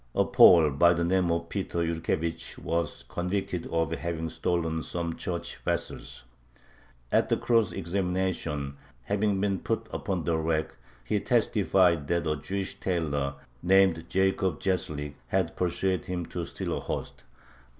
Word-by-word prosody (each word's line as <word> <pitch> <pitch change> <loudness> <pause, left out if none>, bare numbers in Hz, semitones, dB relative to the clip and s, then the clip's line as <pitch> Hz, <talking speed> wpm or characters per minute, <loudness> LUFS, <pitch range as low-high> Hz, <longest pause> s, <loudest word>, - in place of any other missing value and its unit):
A - - +3
Pole 80 -4 +7
by 85 +5 +5
the 85 - 0
name 90 0 +2
of 85 0 0
Peter 95 -4 -2
Yurkevich 80 0 -2
was 85 -7 -2
convicted 90 +1 -2
of 80 -3 0
having 80 +1 -3
stolen 80 -2 -1
some 85 +1 -3
church 85 -1 -4
vessels. - - -4 0.9
At - - +3
the - - +3
cross 115 -3 +2
examination, 90 -6 -2 0.3
having 100 - +1
been 100 -1 0
put - - -2
upon 90 -4 -2
the 85 0 +1
rack, 80 -1 -1 0.3
he - - 0
testified 85 -6 +2
that 85 +1 0
a 75 -1 +1
Jewish 95 +6 -4
tailor, 70 -6 -1 0.3
named 90 -2 +3
Jacob 95 -3 +1
Gzheslik, 75 -6 -2
had 95 -3 0
persuaded 90 0 0
him 90 -2 -2
to - - -4
steal - - -4
a - - -2
host. - - -5
85 Hz, 140 wpm, -28 LUFS, 80-95 Hz, 0.9 s, Pole